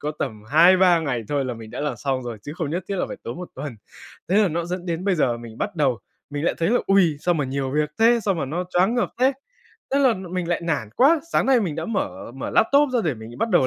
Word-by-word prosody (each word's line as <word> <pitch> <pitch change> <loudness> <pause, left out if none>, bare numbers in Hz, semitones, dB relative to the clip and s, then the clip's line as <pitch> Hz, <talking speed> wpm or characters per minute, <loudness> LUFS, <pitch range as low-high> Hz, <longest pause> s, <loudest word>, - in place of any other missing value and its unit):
có 150 +1 -3
tầm 110 -6 -4
2-3 175 +2 +6
ngày 130 -7 -2
thôi 145 -2 0
là 125 -2 -3
mình 110 -1 -10
đã - - -6
làm 150 - -2
xong 135 -2 -2
rồi, 120 -3 -6
chứ 145 - -7
không 160 -4 -3
nhất 175 +3 -3
thiết 200 - -2
là - - 0
phải - - -6
tốn 120 - -6
1 180 - -7
tuần. 145 -6 -6 0.5
Thế 190 - +2
là 210 -3 +4
nó 170 +1 -2
dẫn 180 +1 -5
đến 170 +1 -3
bây 200 -2 +2
giờ 125 -7 +1
mình 115 -1 -11
bắt - - -3
đầu, 135 -6 +1 0.3
mình 145 +1 -3
lại - - +1
thấy 165 - +1
là: 245 - +4
"Ôi, 190 -6 +4
sao 175 +2 +1
mà 150 -3 0
nhiều 135 0 -2
việc 150 +2 0
thế, 235 +1 +5
sao 195 - +2
mà 160 -5 -2
nó 165 +7 -3
choáng 185 +6 +2
ngợp 245 - 0
thế!", 260 +2 +4 0.6
thế 280 - +4
là 260 -4 +4
mình 180 -2 -4
lại 175 - 0
nản 145 -10 -1
quá. 300 +5 +5
Sáng - - +2
nay 265 -2 +4
mình 175 -8 -2
đã 160 - -4
mở 115 - -3
mở 135 - -5
laptop 280 +6 +4
ra 245 - +3
để 155 -5 0
mình 115 +2 -11
bắt 230 - 0
đầu 175 -9 +4
165 Hz, 280 wpm, -23 LUFS, 135-190 Hz, 0.6 s, 2-3